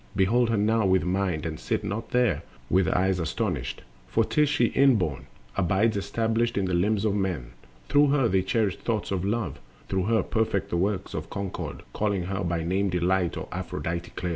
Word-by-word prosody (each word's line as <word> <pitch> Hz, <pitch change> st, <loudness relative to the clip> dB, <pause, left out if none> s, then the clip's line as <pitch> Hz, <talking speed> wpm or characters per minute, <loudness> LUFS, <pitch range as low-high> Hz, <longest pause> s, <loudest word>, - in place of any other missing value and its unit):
Behold 115 Hz, +5 st, +3 dB
her 115 Hz, -, +1 dB
now 110 Hz, +2 st, +2 dB
with 95 Hz, -1 st, +3 dB
mind, 90 Hz, -3 st, 0 dB
and 80 Hz, -2 st, -4 dB
sit -, -, -2 dB
not 110 Hz, +3 st, -4 dB
there 120 Hz, -11 st, +2 dB, 0.3 s
With 95 Hz, -2 st, +4 dB
eyes 95 Hz, 0 st, +2 dB
astonished, 80 Hz, -3 st, -2 dB, 0.2 s
for 115 Hz, -, +2 dB
'tis 150 Hz, +6 st, +2 dB
she 125 Hz, -4 st, +3 dB
inborn 90 Hz, -, +2 dB, 0.3 s
Abides 100 Hz, +5 st, +2 dB
established 115 Hz, +3 st, 0 dB
in 100 Hz, -, +1 dB
the 90 Hz, -, -1 dB
limbs 100 Hz, +4 st, +2 dB
of 105 Hz, -, +2 dB
men. 90 Hz, -12 st, -2 dB, 0.4 s
Through 145 Hz, 0 st, +5 dB
her 135 Hz, -3 st, +3 dB
they 95 Hz, -2 st, +2 dB
cherish 100 Hz, +1 st, 0 dB
thoughts 110 Hz, -4 st, -2 dB
of 95 Hz, -2 st, -1 dB
love, 100 Hz, -, -2 dB, 0.3 s
through 95 Hz, -1 st, 0 dB
her 110 Hz, -2 st, +2 dB
Perfect 100 Hz, -3 st, -1 dB
the 85 Hz, -, +1 dB
works 95 Hz, +2 st, -1 dB
of -, -, -5 dB
concord, 100 Hz, -2 st, -5 dB
calling 100 Hz, -3 st, 0 dB
her 95 Hz, +2 st, -3 dB
By 85 Hz, -1 st, -1 dB
name 95 Hz, +4 st, +1 dB
Delight 90 Hz, 0 st, +1 dB
or -, -, -5 dB
Aphrodite 85 Hz, +1 st, -4 dB
clear. 90 Hz, -, -3 dB
100 Hz, 190 wpm, -26 LUFS, 90-110 Hz, 0.4 s, Through